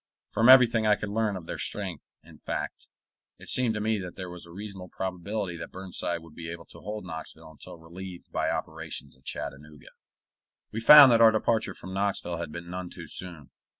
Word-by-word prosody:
From 115 +3 +4
everything 120 -4 +7
I 105 - +6
could 105 - -5
learn 105 -2 0
of 85 - -9
their - - -6
strength, 95 -7 -3 0.2
in - - -16
fact, - - -5 0.5
it - - -12
seemed 120 -3 +1
to - - -2
me 110 0 0
that 90 -2 -7
there 90 -2 -6
was 90 -1 -8
a - - -13
reasonable 95 -1 -8
probability 95 0 -4
that 80 - -8
Burnside 90 -2 -3
would 80 -1 -15
be 80 0 -7
able 85 0 -8
to - - -12
hold 105 -1 -6
Knoxville 80 -2 -8
until 80 - -12
relieved 90 +2 -10
by - - 0
operations 80 -3 -5
at 65 +1 -28
Chattanooga. 75 +3 -7 0.8
We 110 - -3
found 140 +3 +10
that 115 -1 +5
our 115 - +9
departure 110 0 0
from 95 +1 -9
Knoxville 95 -3 -1
had 85 -2 -5
been 85 +2 -7
none 90 0 -5
too - - -9
soon. 85 -6 -7
95 Hz, 200 wpm, -28 LUFS, 85-105 Hz, 0.8 s, found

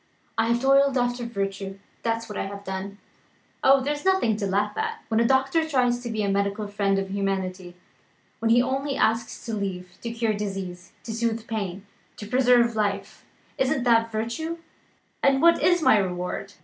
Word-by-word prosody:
I 225 0 +1
have 235 +1 +2
toiled 275 0 +4
after 245 -1 0
virtue 195 -3 -4 0.2
that's 230 0 -1
what 210 - -7
I - - -2
have 200 0 -8
done. 190 +1 -5 0.7
Oh, 270 0 +6
there's 290 +2 -2
nothing 380 - +3
to 200 -2 -2
laugh 205 +2 0
at! 450 0 -3
When 220 0 +2
a 230 - +3
doctor 270 +5 +2
tries 245 -4 +2
to 245 -1 -6
be 220 -2 -1
the 200 - 0
medical 200 +1 -1
friend 200 -1 0
of 195 0 -3
humanity; 190 -2 -3 0.6
when 225 - 0
he 240 +2 +5
only 270 +2 -1
asks 225 +2 0
leave 190 -5 -4
to 235 - -4
cure 230 -1 0
disease, 195 -3 -5
to 225 - -5
soothe 230 0 -1
pain, 200 -4 -4 0.3
to 210 - -7
preserve 245 0 +3
life 200 -1 -2 0.3
isn't 265 -1 +1
that 230 -2 +3
virtue? 235 +10 -3 0.6
And 275 -1 +4
what 335 +3 +5
is 350 -2 +3
my 215 - +6
reward? 185 +1 -3
225 Hz, 175 wpm, -25 LUFS, 200-250 Hz, 0.7 s, Oh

